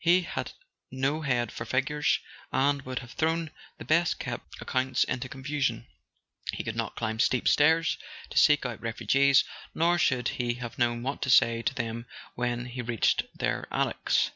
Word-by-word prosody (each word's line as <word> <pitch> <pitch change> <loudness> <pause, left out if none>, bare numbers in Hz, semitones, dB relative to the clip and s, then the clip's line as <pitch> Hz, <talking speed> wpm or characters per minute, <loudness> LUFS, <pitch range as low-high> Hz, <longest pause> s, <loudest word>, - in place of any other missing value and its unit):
He 175 +2 +5
had - - -4 0.4
no 135 +4 -1
head 120 -6 0
for - - -5
figures, 135 +5 +1 0.3
and 140 +1 +2
would 130 -1 -6
have 120 - -14
thrown 160 +1 0 0.3
the - - -9
best 170 +2 +2
kept - - -6
accounts 130 0 +1
into 125 0 -3
con¬ 130 0 -10
fusion; 135 -6 -1 0.7
he - - -3
could - - -4
not - - -3
climb 110 -1 -3
steep 125 0 +2
stairs 160 +2 +4 0.3
to - - -5
seek 150 -2 +5
out 120 -2 -4
refu¬ 115 0 -5
gees, 135 +4 +5 0.3
nor 175 +2 +3
should 130 -6 +2
he 120 -1 -1
have 120 -2 -7
known 120 -1 +1
what 135 +2 -3
to 130 - -1
say 115 -2 +5
to 130 - -1
them 115 -2 -4 0.3
when 120 0 -2
he 125 +1 -5
reached 115 -2 +1
their - - -1
attics. - - +1
130 Hz, 180 wpm, -28 LUFS, 120-145 Hz, 0.7 s, He